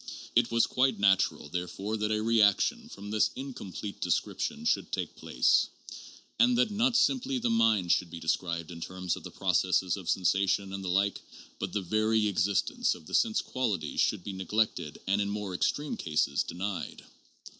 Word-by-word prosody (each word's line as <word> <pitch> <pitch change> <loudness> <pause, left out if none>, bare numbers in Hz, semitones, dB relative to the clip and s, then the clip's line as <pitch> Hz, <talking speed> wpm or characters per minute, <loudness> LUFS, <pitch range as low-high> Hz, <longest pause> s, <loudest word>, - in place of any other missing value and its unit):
It 120 0 +4
was 115 0 +3
quite 130 -2 +1
natural 95 -6 +2
therefore 90 +6 -4
that 105 0 -1
a 110 0 0
reaction 110 -3 +3
from 100 +1 -9
this 110 0 +3
in 135 +1 -6
complete 100 -1 -7
description 105 - -1
should - - +1
take - - -3
place, - - +2 0.7
and 245 0 +5
that 245 -3 +2
not 235 +4 +2
simply 265 -1 +2
the 240 -1 0
mind 110 - +3
should 90 - +2
be 85 0 -8
described 85 0 -2
in 85 -1 -9
terms 90 0 -3
of - - -9
the - - -8
processes 95 -1 +1
of 95 -4 -7
sensation 95 +1 +1
and 100 0 -5
the 95 - -3
like, 100 +2 +1 0.4
but - - -3
the 105 - -1
very 110 +3 +2
existence 100 0 +1
of 80 - -14
the - - -12
sense 225 -1 +2
qualities 105 - -1
should - - +1
be 100 - -5
neglected 95 -4 -1
and 100 +2 +1
in 100 - -1
more 100 -2 -4
extreme 145 +11 -1
cases 75 -3 0
denied. 90 -1 -5
100 Hz, 175 wpm, -29 LUFS, 90-115 Hz, 0.7 s, and